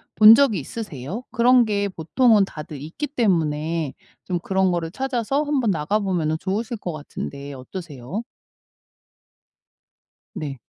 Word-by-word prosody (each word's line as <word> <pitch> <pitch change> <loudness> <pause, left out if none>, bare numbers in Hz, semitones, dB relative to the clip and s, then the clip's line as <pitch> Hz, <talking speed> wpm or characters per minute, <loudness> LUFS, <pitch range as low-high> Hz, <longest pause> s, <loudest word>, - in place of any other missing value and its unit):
본 215 +1 +10
적이 230 - +4
있으세요? 190 - -6
그런 245 +1 +5
게 205 -1 0
보통은 205 +5 +3
다들 150 -4 -8
있기 175 - -5
때문에 165 - 0 0.3
좀 180 -2 -2
그런 190 +1 +1
거를 170 -1 -2
찾아서 265 +3 -1
한번 270 -8 +1
나가보면은 165 -1 0
좋으실 220 +4 -2
것 175 -4 -5
같은데 145 -1 -7
어떠세요? 150 - -6 2.1
네. 140 -3 -5
190 Hz, 265 characters per minute, -23 LUFS, 155-225 Hz, 2.1 s, 본